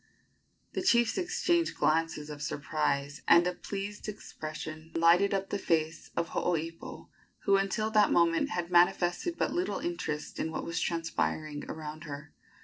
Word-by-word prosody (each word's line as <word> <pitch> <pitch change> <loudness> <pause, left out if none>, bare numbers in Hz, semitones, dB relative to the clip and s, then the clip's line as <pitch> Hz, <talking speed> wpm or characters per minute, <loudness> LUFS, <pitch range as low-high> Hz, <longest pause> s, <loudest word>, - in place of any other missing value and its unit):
The - - -1
chiefs 235 -10 +3
exchanged 345 -1 +1
glances 155 -1 +1
of 145 -1 -8
surprise, 145 -1 -1
and 170 +1 +7
a 180 - 0
pleased 200 +3 -5
expression 155 -5 -7
lighted 170 +4 +5
up 195 0 -1
the 200 - -1
face 160 -3 0
of 170 -1 0
Hooipo, 165 -1 -3 0.3
who 200 - +4
until 195 +3 0
that 210 -1 +4
moment 170 -1 +3
had 175 0 -3
manifested 175 - +3
but - - 0
little 360 +2 -1
interest 160 - -4
in 160 - -1
what - - -4
was 170 0 -2
transpiring 155 -3 -2
around 155 0 -6
her. 145 0 -8
170 Hz, 145 wpm, -30 LUFS, 155-200 Hz, 0.3 s, and